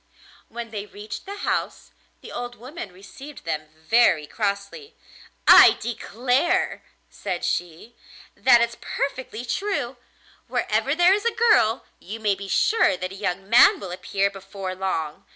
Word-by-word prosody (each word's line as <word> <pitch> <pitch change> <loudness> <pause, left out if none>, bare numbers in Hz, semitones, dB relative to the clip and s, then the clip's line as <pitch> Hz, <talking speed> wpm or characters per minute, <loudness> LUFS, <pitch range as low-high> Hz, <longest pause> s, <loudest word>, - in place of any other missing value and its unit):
When 235 -1 -7
they 210 -1 -6
reached 210 - -9
the 400 +1 -6
house - - -2 0.3
the - - -11
old 245 0 -6
woman 250 - -9
received 200 +10 -12
them 155 -1 -3
very 160 -1 +3
crossly. 200 - -4 0.5
'I - - +9
declare,' 250 - -1 0.3
said - - -4
she, 175 +7 -3 0.4
'that 240 -2 +5
it's 235 0 -1
perfectly 260 -4 -4
true: 265 - -2 0.5
wherever 275 - 0
there 350 +2 +5
is 415 +3 -1
a 470 - +3
girl 435 - +3
you 215 +5 -8
may 210 -2 +1
be 195 0 -7
sure 435 - +2
that 185 +1 -5
a - - -9
young 195 -1 -3
man 235 +3 +6
will 190 -3 -7
appear 195 +2 -1
before 195 -1 -7
long! 180 -5 -4
220 Hz, 145 wpm, -23 LUFS, 195-260 Hz, 0.5 s, I